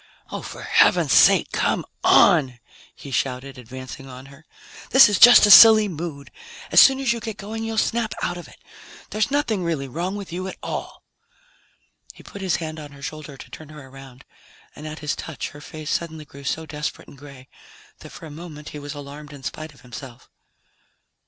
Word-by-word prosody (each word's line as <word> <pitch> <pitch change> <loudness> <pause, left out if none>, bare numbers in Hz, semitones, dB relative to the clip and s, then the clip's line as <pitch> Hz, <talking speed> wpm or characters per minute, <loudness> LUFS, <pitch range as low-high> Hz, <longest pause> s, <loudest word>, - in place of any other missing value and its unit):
"Oh, - - -5
for - - -9
heaven's - - +3
sake, - - +5
come - - -1 0.2
on!" 150 - +4 0.4
he 140 - -11
shouted, 130 +1 -3
advancing 130 +2 -10
on 130 +1 -11
her. 155 +5 -20 0.4
"This 265 -1 +8
is 205 -2 0
just 245 -2 +9
a 205 - +4
silly 215 0 +9
mood. 155 -5 -7 0.4
As - - +6
soon 270 0 +6
as 260 -3 +1
you 235 - -5
get 220 -2 -7
going, 220 +2 -6
you'll 225 0 -4
snap 230 0 -1
out 175 - -2
of 175 - -10
it. - - -18 0.5
There's 215 +4 -1
nothing 270 -9 -1
really 160 -5 -3
wrong 175 +9 -4
with 200 -4 -8
you 185 +2 -4
at 190 - -8
all." - - -6 1.1
He - - -16
put 200 - -11
his 190 -2 0
hand 155 -1 -6
on 145 -1 -11
her 140 0 -14
shoulder 155 -2 -8
to - - -13
turn 155 -2 -11
her 150 -3 -13
around, 135 -1 -14 0.5
and 155 - -9
at 155 0 -8
his 150 - -1
touch 160 - -7
her 145 - -14
face 155 0 -8
suddenly 160 -2 -4
grew 140 0 -14
so 160 +3 -3
desperate 150 0 -6
and - - -15
gray 135 -2 -14 0.5
that - - -12
for - - -12
a 155 - -10
moment 150 -1 -10
he 150 - -9
was 145 +1 -8
alarmed 145 +1 -10
in 140 -2 -13
spite 155 +1 -7
of - - -21
himself. 125 0 -12
155 Hz, 195 wpm, -22 LUFS, 140-190 Hz, 1.1 s, just